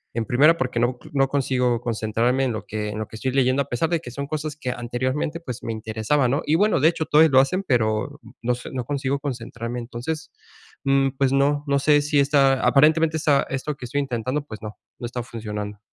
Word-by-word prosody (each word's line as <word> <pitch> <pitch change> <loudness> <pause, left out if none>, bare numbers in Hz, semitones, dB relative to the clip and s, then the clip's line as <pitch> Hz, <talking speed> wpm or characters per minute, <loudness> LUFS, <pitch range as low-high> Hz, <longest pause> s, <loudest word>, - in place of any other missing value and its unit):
En 115 -1 -1
primera, 150 +9 +4
porque 125 -2 -1
no, 120 +1 0
no 135 -1 +2
consigo 125 -3 0
concentrarme 115 +3 0
en 130 - +1
lo 110 - -6
que 105 0 -3
en 105 +1 -5
lo 110 - -4
que - - -12
estoy 130 +4 -2
leyendo, 130 +1 +2
a - - -20
pesar 125 +7 0
de 170 -1 +1
que 125 -6 -9
son 140 +3 -5
cosas 155 0 -4
que 135 -4 -5
anteriormente, 130 +6 -2
pues, 125 -8 -7
me 115 - -3
interesaban, 110 +5 0
¿no? 140 - +1
Y 150 - +1
bueno, 205 -1 +3
de 150 - +5
hecho, 165 -2 -2
todavía 155 +1 +5
lo 130 - +6
hacen, 185 +9 +1
pero, 110 -4 0 0.2
no 125 +1 +1
sé, 125 - -9
no 125 -2 -3
consigo 140 0 -1
concentrarme. 120 -3 -5
Entonces, 125 +7 -5 0.5
mm, 135 -1 +3
pues, 135 -1 +2
no, 145 +1 +2
no 140 0 +2
sé, 145 +1 +4
si 145 0 +1
está, 135 -1 +3
aparentemente 155 +3 +4
esta 145 -2 +3
esto 135 +3 -3
que 130 - -8
estoy 140 +4 -1
intentando, 130 +2 -2
pues, 110 -7 -9
no, 105 -1 -8 0.2
no - - -5
está 125 0 -5
funcionando. 105 -3 -6
130 Hz, 220 wpm, -23 LUFS, 120-145 Hz, 0.5 s, lo